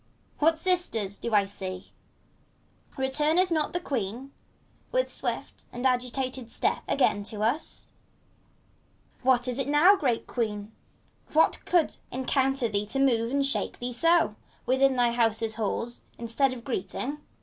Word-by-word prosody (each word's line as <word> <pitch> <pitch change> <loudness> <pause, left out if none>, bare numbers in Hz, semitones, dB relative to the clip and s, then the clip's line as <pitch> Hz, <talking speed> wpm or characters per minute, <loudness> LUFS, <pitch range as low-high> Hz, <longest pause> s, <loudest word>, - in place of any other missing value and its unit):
What, 320 +2 +4
Sisters, 320 - +3
do 235 - -5
I 200 -1 +5
see 190 -2 -6
T - - -21 1.1
Retumeth 300 +7 +1
not 310 -2 +1
the 350 - -1
Queen 255 - -4 0.6
With - - +1
swift - - -4
and 245 +2 -5
agitated 255 -1 -1
step - - 0
again 235 -6 +2
to 220 - -5
usT 250 +9 -2 1.3
What 255 -1 +3
is 250 +1 -2
it 270 - 0
now, 305 +8 +6
great 255 - 0
Queen, 210 -3 -3 0.6
what 315 +1 +3
could 345 -3 +2
encounter 265 0 +1
thee 205 -1 -2
To 270 - -4
move 235 -4 +2
and 280 +2 +1
shake 275 - -1
thee 245 0 -4
so, 330 -5 +3 0.3
within 265 +2 +3
thy 240 -1 +3
house's 225 -2 +1
halls, 230 +2 -3 0.2
Instead 235 +4 +1
of 245 -2 -7
greeting! 255 +4 -4
255 Hz, 140 wpm, -27 LUFS, 230-280 Hz, 1.3 s, now